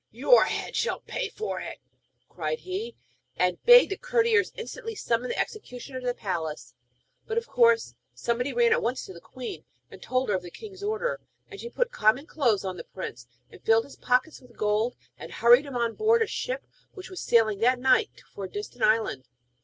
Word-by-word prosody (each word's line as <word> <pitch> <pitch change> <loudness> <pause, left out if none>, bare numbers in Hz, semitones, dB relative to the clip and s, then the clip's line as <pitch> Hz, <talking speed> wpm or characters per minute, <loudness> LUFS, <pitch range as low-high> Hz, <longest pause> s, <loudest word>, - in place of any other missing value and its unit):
Your - - +5
head - - -3
shall 485 - -1
pay - - -4
for 435 - -4
it!' - - -7 0.5
cried 475 - -3
he; 410 +6 -5 0.4
and 180 -1 0
bade 485 -3 +8
the 390 - -2
courtiers 465 -3 +2
instantly 455 -1 -6
summon 240 - -1
the - - -3
executioner 260 - -5
to 250 - -5
the 245 - 0
palace. 160 - -4 0.5
But 450 - -3
of 465 - 0
course 470 -2 +3 0.2
somebody 245 +3 -2
ran 475 -1 +3
at 465 +1 +3
once 255 - -2
to 190 - -10
the 170 - -12
queen, 255 -1 -8 0.3
and - - -12
told 255 -1 -1
her 205 - +2
of 185 - -2
the 175 - -9
king's 390 - -11
order, 445 +4 -2 0.3
and 405 - -9
she 470 - -6
put - - -1
common 255 - +2
clothes 235 -12 +1
on 185 -1 -4
the - - -7
prince, 120 -10 -8 0.2
and - - -14
filled 225 0 +4
his 280 - -13
pockets 255 +5 0
with 250 -2 -19
gold, 215 +3 +1 0.2
and - - -9
hurried 245 +5 +5
him 275 - -7
on 235 -1 0
board 450 +1 +3
a - - -1
ship - - -4 0.3
which 380 -1 -9
was 370 - -6
sailing 220 -4 +3
that 250 +3 +3
night 255 +1 +2
for 200 - -5
a - - -8
distant 210 +5 -6
island. 215 - +1
255 Hz, 200 wpm, -27 LUFS, -, 0.5 s, bade